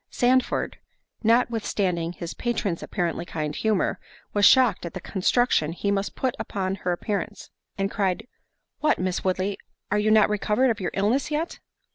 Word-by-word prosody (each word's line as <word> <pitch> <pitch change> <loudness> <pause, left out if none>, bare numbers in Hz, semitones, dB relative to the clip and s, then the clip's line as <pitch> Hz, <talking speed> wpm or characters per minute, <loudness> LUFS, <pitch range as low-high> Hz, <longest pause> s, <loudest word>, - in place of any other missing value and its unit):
Sandford, 255 +1 +1 0.4
notwithstanding 210 -7 +1
his 170 -1 -6
patron's 210 -8 -2
apparently 175 -4 -2
kind 150 -3 -4
humour, 215 -4 0 0.3
was 205 -1 +4
shocked 250 -7 +5
at 170 - -6
the - - -3
construction 185 -4 +1
he 200 +3 -1
must 200 0 -1
put 260 -2 0
upon 190 -1 -2
her 185 -2 -2
appearance, 205 +3 -3 0.3
and 195 0 -1
cried, 200 +2 -1 0.5
"What, 305 - +2
Miss 185 0 -2
Woodley, 190 +1 -1 0.3
are 210 - +3
you 210 +1 +2
not 215 -1 +6
recovered 210 +4 +2
of 225 - -3
your 185 - -1
illness 225 +9 +1
yet?" 310 +3 -2
200 Hz, 155 wpm, -25 LUFS, 185-230 Hz, 0.5 s, not